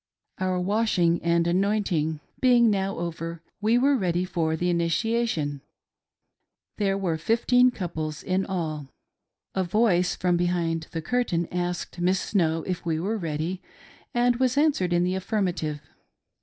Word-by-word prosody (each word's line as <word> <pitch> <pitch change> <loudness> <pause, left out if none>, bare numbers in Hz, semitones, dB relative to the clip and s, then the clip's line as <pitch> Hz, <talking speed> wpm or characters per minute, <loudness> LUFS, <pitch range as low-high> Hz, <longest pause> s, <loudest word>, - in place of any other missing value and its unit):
Our 185 -1 0
washing 180 -3 +1
and 170 0 +2
anointed 175 -4 0 0.2
being 240 -3 +5
now 195 -1 -1
over, 165 -1 -5 0.2
we 220 +3 +3
were 275 +3 +4
ready 180 -5 0
for 165 -3 -1
the 175 +3 -1
initiation 170 - 0 0.6
— - - -55
there 195 -1 +1
were 185 -4 -1
about 160 - -5
fifteen 245 +2 +4
couples 160 - -5
in 185 +1 0
all. 155 -7 -3 0.7
A 190 - 0
voice 180 -1 +2
from 175 -1 +1
behind 170 -2 0
the 165 -1 -5
curtain 175 -6 0
asked 175 0 -3
Miss 185 +2 +2
Snow 165 -6 0
if 180 -2 -4
we 160 -2 -1
were 200 +7 -1
ready, 165 +2 -3 0.5
and 245 0 +2
was 255 +1 +1
answered 285 - +2
in 175 0 +3
the 180 +1 0
affirmative. 180 -7 -2
180 Hz, 145 wpm, -26 LUFS, 165-210 Hz, 0.7 s, being